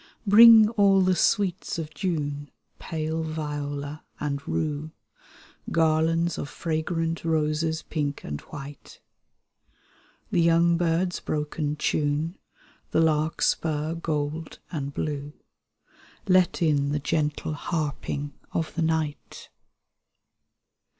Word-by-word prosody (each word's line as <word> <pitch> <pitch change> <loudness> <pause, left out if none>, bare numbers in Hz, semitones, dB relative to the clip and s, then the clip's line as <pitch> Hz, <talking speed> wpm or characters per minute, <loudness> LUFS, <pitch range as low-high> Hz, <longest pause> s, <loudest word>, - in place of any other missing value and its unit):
Bring 220 +1 +9
all 200 -3 +4
the 185 0 +3
sweets 190 -2 +1
of 160 -2 -5
Jvme, 145 -3 -3 0.3
Pale 160 0 -3
viola 150 -2 -4 0.2
and 140 -1 -2
rue, 155 0 -2 0.8
Garlands 165 +1 +2
of 145 - -4
fragrant 165 0 -2
roses, 160 0 0
pink 145 -2 -3
and 75 0 -5
white. 145 -2 -10 1.3
The 175 - +3
young 170 +1 +4
birds' 175 +1 0
broken 150 0 -2
tune. 150 +3 -1 0.5
The - - +1
larkspur 155 0 +1
gold 155 -1 -3
and 140 -4 -3
blue, 145 0 -4 0.9
Let 185 -2 +3
in 145 -2 +2
the 150 - 0
gentle 150 +1 -1
harping 145 -2 -3 0.2
of 165 -1 -2
the 170 - -2
night. 160 -2 -2
155 Hz, 100 wpm, -26 LUFS, 150-165 Hz, 1.3 s, Bring